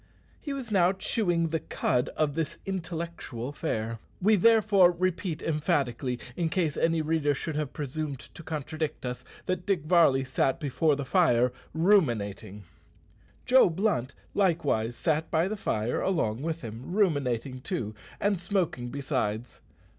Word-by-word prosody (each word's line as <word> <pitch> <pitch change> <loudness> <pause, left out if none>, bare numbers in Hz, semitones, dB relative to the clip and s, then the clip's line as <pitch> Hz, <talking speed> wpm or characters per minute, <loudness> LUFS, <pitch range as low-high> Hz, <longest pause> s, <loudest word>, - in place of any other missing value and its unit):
He 290 - -5
was 265 -5 -5
now 185 -2 +4
chewing 175 -4 0
the 160 0 0
cud 125 -3 0
of 150 -2 +1
this 160 -1 -2
intellectual 170 -9 -4
fare. 115 -5 -3 0.2
We 215 +4 +4
therefore 210 -3 +5
repeat 180 -2 -2
emphatically 140 -5 0 0.2
in 170 -2 0
case 160 -3 0
any 165 -1 +1
reader 150 -2 +1
should 155 +3 -4
have 150 -3 -2
presumed 145 +1 -4
to - - -12
contradict 155 -2 -4
us 125 0 -4 0.2
that 185 0 -2
Dick 190 -7 +1
Varley 155 -6 +5
sat 130 +2 0
before 150 0 +1
the 140 0 -4
fire 125 -6 +3 0.2
ruminating! 120 - +1 0.8
Joe 255 -5 +6
Blunt 160 - 0 0.2
likewise 150 - +1
sat 160 +2 0
by 165 +2 +2
the 215 - -2
fire 110 - -1
along 130 - 0
with 165 +1 -3
him, 115 +7 -7
ruminating 135 - 0
too, 110 -4 -3 0.3
and 200 -3 +1
smoking 175 -10 -1
besides. 125 -4 -3
155 Hz, 140 wpm, -28 LUFS, 130-180 Hz, 0.8 s, Joe